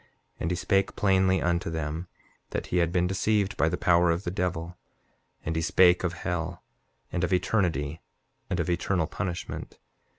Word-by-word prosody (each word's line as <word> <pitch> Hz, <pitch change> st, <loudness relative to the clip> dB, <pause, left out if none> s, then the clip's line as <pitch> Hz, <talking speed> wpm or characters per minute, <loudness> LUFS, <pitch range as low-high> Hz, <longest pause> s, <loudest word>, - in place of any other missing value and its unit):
7:18 -, -, -31 dB, 0.3 s
And 80 Hz, -, -1 dB
he 90 Hz, -, 0 dB
spake 95 Hz, +2 st, +1 dB
plainly 95 Hz, -1 st, +3 dB
unto 85 Hz, -1 st, 0 dB
them, 80 Hz, +2 st, -3 dB, 0.4 s
that -, -, -3 dB
he -, -, +3 dB
had 85 Hz, -1 st, +2 dB
been 90 Hz, 0 st, +2 dB
deceived 100 Hz, +2 st, +1 dB
by 80 Hz, -, +2 dB
the -, -, -2 dB
power 85 Hz, 0 st, +4 dB
of 85 Hz, +3 st, 0 dB
the 85 Hz, -, -2 dB
devil. 90 Hz, -2 st, -2 dB, 0.7 s
And 80 Hz, -, -1 dB
he 80 Hz, -, +1 dB
spake 90 Hz, +2 st, +5 dB
of 90 Hz, -2 st, 0 dB
hell, 85 Hz, 0 st, -3 dB, 0.5 s
and 90 Hz, -, -1 dB
of 90 Hz, -, 0 dB
eternity, 85 Hz, -6 st, 0 dB, 0.5 s
and -, -, -1 dB
of -, -, 0 dB
eternal 90 Hz, 0 st, +1 dB
punishment. 90 Hz, +2 st, -5 dB
90 Hz, 175 wpm, -27 LUFS, 85-95 Hz, 0.7 s, spake